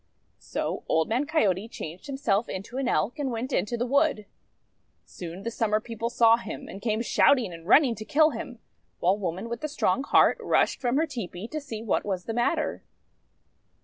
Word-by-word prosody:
So - - -4
Old 160 0 +2
Man 250 +6 0
Coyote 210 - +1
changed 175 - -8
himself 240 -6 0
into 205 +7 -6
an 270 - -1
Elk, 225 - 0
and 280 -2 -1
went 250 +3 -4
into 210 +6 0
the 240 - -1
wood. 280 -4 +2 0.8
Soon 175 +2 -8
the 230 - -3
Summer 215 -2 +1
People 230 +1 -4
saw 230 -1 +5
him, 235 - -7
and 195 - -9
came 220 0 0
shouting, 250 -5 +3
and 165 0 -11
running 265 +2 +6
to 220 - -7
kill 310 +7 +4
him; 245 0 -7 0.4
while 185 +3 +3
Woman 185 +3 -3
with 235 0 -5
the 305 - -2
Strong 270 -3 0
Heart - - +5
rushed - - +1
from 250 0 +1
her 320 - +3
tepee 220 - -6
to 310 0 -4
see 225 -6 -7
what 225 - 0
was 190 -3 -3
the 225 - -3
matter. 270 +7 0
230 Hz, 190 wpm, -27 LUFS, 200-265 Hz, 0.8 s, running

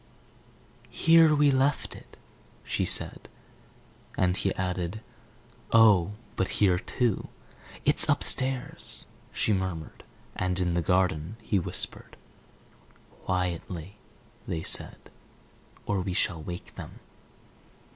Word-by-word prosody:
"Here 165 -2 +5
we 145 -1 +4
left 135 +2 0
it," - - -16 0.5
she - - -2
said. - - 0 0.9
And 90 -1 +1
he 95 0 0
added, 90 +2 -3 0.7
"Oh, 105 -5 +5 0.2
but 95 - 0
here 95 -4 +3
too!" 120 -1 -2 0.6
"It's - - +5
upstairs," 130 -1 +2 0.3
she 110 - 0
murmured. 95 -5 -4 0.3
"And 95 0 -1
in 90 -1 0
the 85 - 0
garden," 90 +2 0
he 100 -2 0
whispered 85 - -4 1.1
"Quietly," 90 +1 -3 0.5
they 80 -1 -3
said, - - 0 0.7
"or 100 -2 -1
we 90 0 -3
shall 85 -3 -1
wake 85 +2 -8
them." - - -10
95 Hz, 105 wpm, -27 LUFS, 90-110 Hz, 1.1 s, Here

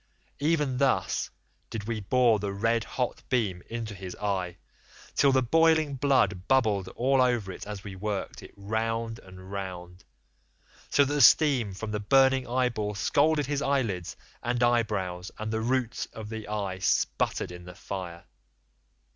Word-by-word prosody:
Even 145 -4 +1
thus 135 -2 +1 0.4
did 110 -2 -5
we 110 +1 -3
bore 115 +1 +3
the 100 0 -3
red 115 +3 +1
hot 125 +1 -3
beam 105 -8 0
into 115 -2 -4
his 95 -2 -7
eye, 95 -4 -2 0.6
till 140 - +4
the 130 -1 +3
boiling 160 +2 +3
blood 125 -9 +1
bubbled 110 -8 +2
all 130 +2 +3
over 120 -6 +1
it 95 - -9
as 105 -2 -6
we 100 -3 -7
worked 100 +1 -4
it - - -12
round 115 +2 -2
and 95 0 -13
round, 90 -2 -6 0.9
so 145 - +4
that 145 - -2
the 145 - +2
steam 135 -11 +5
from 105 +2 -5
the 105 - -2
burning 130 +3 +3
eyeball 120 -4 -1
scalded 150 +7 +2
his 145 +1 -2
eyelids 120 - -1 0.3
and 120 0 0
eyebrows, 105 -7 0
and 110 +1 -4
the 110 - -1
roots 125 0 -1
of 110 -1 -9
the 110 -1 -6
eye 100 -3 -3
sputtered 95 -1 0
in 90 0 -10
the 90 0 -10
fire. 90 -3 -6
110 Hz, 155 wpm, -28 LUFS, 100-130 Hz, 0.9 s, steam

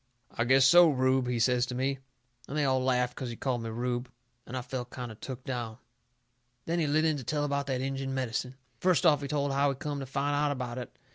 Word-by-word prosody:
"I 120 - -1
guess 130 +1 +5
so, 175 -1 +8
Rube," 130 -2 +2
he 125 -1 0
says 125 +1 +2
to 125 - -5
me. 135 +1 -1 0.5
And 145 - -4
they 150 - +2
all 130 -1 +2
laughed 125 -1 +1
'cause 130 -3 -4
he 120 - -5
called 125 -1 -2
me 115 - -4
Rube, 120 +2 -2 0.4
and 130 - -5
I 125 - -3
felt 125 -1 -5
kind 125 -2 -6
of 110 - -12
took 130 -1 -7
down. 120 -4 -4 0.9
Then 170 +1 0
he 160 - +1
lit 155 +2 +2
in 155 -2 +2
to 135 - -6
tell 145 +4 -1
about 140 -1 -1
that 130 -2 -1
Injun 135 0 -3
medicine. 130 -1 -2 0.2
First 180 0 +2
off 150 -3 +5
he 140 - -3
told 145 0 0
how 140 +1 +3
he 135 - -1
come 145 +1 -4
to 135 - -6
find 140 +2 -1
out 145 0 +2
about 125 -2 -4
it. 125 - -9
130 Hz, 250 wpm, -29 LUFS, 125-145 Hz, 0.9 s, so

